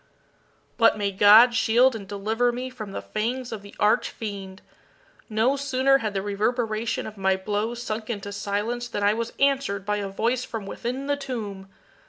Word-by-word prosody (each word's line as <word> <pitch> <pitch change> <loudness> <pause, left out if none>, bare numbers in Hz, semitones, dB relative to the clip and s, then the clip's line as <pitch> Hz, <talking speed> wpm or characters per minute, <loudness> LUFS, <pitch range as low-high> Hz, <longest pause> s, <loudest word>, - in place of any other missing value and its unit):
But 230 -1 +5
may 200 -1 -1
God 210 +5 +7
shield 245 +1 +4
and 200 -3 -7
deliver 220 +5 0
me 250 +2 -5
from 215 -5 -8
the - - -5
fangs 240 +4 -3
of 220 -3 -5
the 200 0 -13
arch 220 +3 +3
fiend! 200 -4 -7 0.7
No 225 +5 +2
sooner 270 0 +2
had 215 -4 -3
the 195 - -1
reverberation 220 +2 -1
of 215 -1 -8
my 190 0 +2
blows 210 +5 -3
sunk 215 -1 -4
into 205 -3 -4
silence 205 +4 -2
than 205 -4 -3
I 205 +1 +4
was 230 +1 -3
answered 275 -8 +1
by 210 0 0
a 200 -1 -3
voice 235 +5 0
from 225 -5 -6
within 250 +7 -4
the 285 0 0
tomb! 210 -8 -6
220 Hz, 180 wpm, -25 LUFS, 205-245 Hz, 0.7 s, God